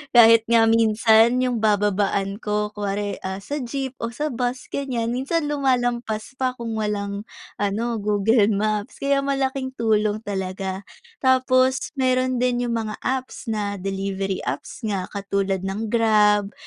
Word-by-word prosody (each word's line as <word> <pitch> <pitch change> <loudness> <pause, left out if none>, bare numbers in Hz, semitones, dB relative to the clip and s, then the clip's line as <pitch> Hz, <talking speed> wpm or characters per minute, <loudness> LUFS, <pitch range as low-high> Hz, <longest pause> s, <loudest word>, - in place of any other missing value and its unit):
Kahit 230 -1 +7
nga 230 -1 +5
minsan, 225 +2 +4
yung 250 -2 0
bababaan 205 -1 +1
ko, 210 -1 -1
kunwari, 205 0 -3
ah, 190 +1 -5
sa 290 +8 -4
jeep 265 +1 -3
o 230 - -2
sa 300 +2 -2
bus, 245 +1 -3
ganyan, 245 -5 -2
minsan 275 +7 -1
lumalampas 245 -5 0
pa 255 -1 0
kung 235 -2 -5
walang 205 0 -3 0.3
ano, 220 +3 -1
Google 210 +1 +3
Maps. 210 0 -1
Kaya 275 0 +1
malaking 270 -1 -2
tulong 215 -2 +1
talaga. 190 -1 -4 0.3
Tapos 260 0 +2
meron 255 -1 +1
din 245 0 +1
yung 235 -1 -1
mga 215 -1 -4
apps 260 0 -3
na 205 -2 -2
delivery 195 0 -3
apps - - -4
nga, 195 -3 -1
katulad 200 -1 -1
ng 200 +3 -3
Grab, 210 -3 +3
220 Hz, 140 wpm, -23 LUFS, 205-250 Hz, 0.3 s, Kahit